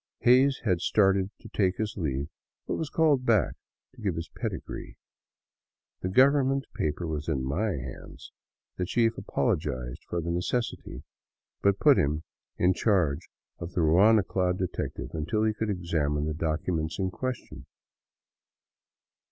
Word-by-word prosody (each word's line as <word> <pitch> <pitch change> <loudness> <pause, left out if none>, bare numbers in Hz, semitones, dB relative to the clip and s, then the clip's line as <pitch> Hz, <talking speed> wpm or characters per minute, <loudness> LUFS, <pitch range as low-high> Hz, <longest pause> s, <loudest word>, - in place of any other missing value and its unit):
Hays 130 +3 +5
had 90 -5 +2
started 95 -1 +3
to - - -11
take 95 -3 +1
his 110 +1 -2
leave, 70 -6 -2 0.4
but - - -2
was 160 - -2
called 150 -5 +3
back 115 -4 +3 0.4
to 125 - -15
give 95 -6 -1
his 80 +1 -5
pedigree. - - -6 1.0
The 90 - -2
government 135 +4 +4
paper 75 +3 -2
was 75 -2 -4
in 70 -5 0
my 95 +10 0
hands. 65 -4 -8 0.5
The 90 - -1
chief 115 +2 +2
apologized 60 -1 -2
for 85 - -1
the 85 +1 -2
necessity, 90 +8 -2 0.6
but 100 0 +3
put 145 -3 +6
him 75 +2 0 0.3
in 90 +1 +3
charge 90 -10 +1 0.3
of 85 +1 -6
the 90 - +1
ruana 95 +6 +5
clad 90 -1 0
detective 95 -1 -4
until 80 +8 -1
he 110 0 +2
could 110 0 -3
examine 80 -6 0
the 80 - -1
docu 80 +3 -1
ment 80 0 -2
in 95 -1 -1
question. 130 +4 -5
90 Hz, 145 wpm, -28 LUFS, 80-110 Hz, 1.0 s, put